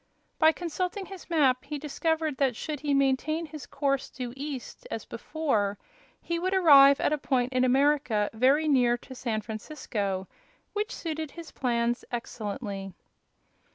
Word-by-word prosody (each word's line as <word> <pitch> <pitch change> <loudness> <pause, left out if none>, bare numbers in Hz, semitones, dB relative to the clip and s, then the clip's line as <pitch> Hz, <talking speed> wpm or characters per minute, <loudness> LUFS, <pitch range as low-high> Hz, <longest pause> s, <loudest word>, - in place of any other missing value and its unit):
By 315 -1 +7
consulting 360 +4 -3
his 385 -2 -11
map 275 -6 +3
he 295 +2 -5
discovered 315 0 -1
that 265 -4 +2
should 300 +4 -4
he 290 0 -2
maintain 275 +4 +1
his 305 -2 -9
course 275 -2 -1
due 245 -2 -6
east, 285 - -6
as - - -5
before, 215 -11 -1 0.4
he 340 0 -2
would 370 +2 0
arrive 280 -6 +8
at - - +2
a 305 - 0
point 255 -2 0
in 255 0 +3
America 260 -5 +3
very 270 +7 +3
near 245 -4 +4
to 260 - -12
San 230 -4 -2
Francisco, 210 -4 -4 0.5
which 425 +3 -2
suited 315 -2 -4
his 335 +2 -10
plans 240 -1 0
excellently. 205 -4 -5
275 Hz, 150 wpm, -28 LUFS, 240-315 Hz, 0.5 s, arrive